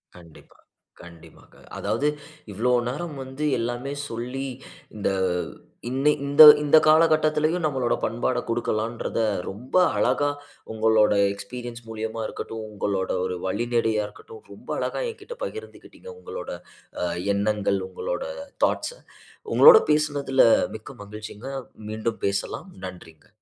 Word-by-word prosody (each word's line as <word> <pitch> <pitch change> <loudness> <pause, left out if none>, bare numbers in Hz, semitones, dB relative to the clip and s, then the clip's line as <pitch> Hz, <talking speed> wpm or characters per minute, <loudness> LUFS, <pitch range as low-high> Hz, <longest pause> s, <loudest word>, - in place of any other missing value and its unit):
கண்டிப்பா, 85 -2 -17 0.4
கண்டிப்பாங்க. 85 -2 -16 0.2
அதாவது, 145 - -1 0.4
இவ்ளோ 115 +6 0 0.2
நேரம் 150 +4 -5
வந்து 130 +3 -5 0.2
எல்லாமே 120 +4 -3 0.2
சொல்லி 125 +4 -4 0.5
இந்த 105 - 0 0.8
இன்ன 135 +4 +2
இந்த 145 +2 +8 0.2
இந்த 150 +1 +5
காலகட்டத்துலயும் 155 +1 +3
நம்மளோட 130 -5 0
பண்பாட 120 +2 -1
கொடுக்கலான்றத 115 0 -2 0.3
ரொம்ப 110 +7 -8 0.2
அழகா 145 0 +2 0.4
உங்களோட 110 -1 +3 0.2
எக்ஸ்பீரியன்ஸ் 120 +4 -8
மூலியமா 110 0 -4
இருக்கட்டும், 110 -1 -6
உங்களோட 100 -2 -2 0.2
ஒரு 90 -1 -3
வழிநடையா 115 +1 0
இருக்கட்டும். 440 - -14
ரொம்ப - - -16
அழகா - - -2
எங்கிட்ட 475 +1 -10
பகிர்ந்துக்கிட்டீங்க. 445 0 -9
உங்களோட 465 +2 -7 0.5
அ - - +1 0.3
எண்ணங்கள், 100 -1 0
உங்களோட - - -4 0.4
தாட்ஸ்‌ - - -2 0.5
உங்களோட 470 -1 +9
பேசுனதுல 145 -3 +2 0.3
மிக்க 110 - -10
மகிழ்ச்சிங்க! 105 +3 -9 0.4
மீண்டும் 110 +1 -3
பேசலாம். 100 0 -2 0.2
நன்றிங்க. 85 -4 -11
120 Hz, 110 wpm, -24 LUFS, 105-150 Hz, 0.8 s, உங்களோட